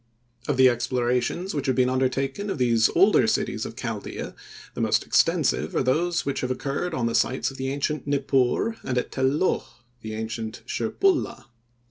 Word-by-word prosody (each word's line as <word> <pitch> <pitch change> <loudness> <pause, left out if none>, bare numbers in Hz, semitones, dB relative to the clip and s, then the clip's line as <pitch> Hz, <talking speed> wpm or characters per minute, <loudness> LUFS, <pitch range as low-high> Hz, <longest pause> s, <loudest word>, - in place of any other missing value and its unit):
Of 145 - 0
the 130 0 +7
explorations 125 +8 0
which 145 -3 -2
have 130 - +2
been 125 -1 +3
undertaken 135 +8 -1
of 195 - -2
these 115 -3 +3
older - - +5
cities - - -1
of - - -10
Chaldea, - - -5 0.4
the - - -4
most - - +2
extensive - - +2
are - - +2
those 165 +6 +1
which 140 - -2
have 125 - -2
occurred 140 +6 -2
on 125 - -1
the 115 - 0
sites 130 +4 +1
of 135 - -11
the 130 0 -2
ancient 145 +2 -2
Nippur 140 - +1
and 125 - -2
at 125 - -1
Tel 130 -1 +1
Loh, 150 +7 +1 0.4
the 110 -1 -6
ancient 110 0 -5
Shirpulla. 315 - 0
130 Hz, 175 wpm, -25 LUFS, 125-145 Hz, 0.4 s, the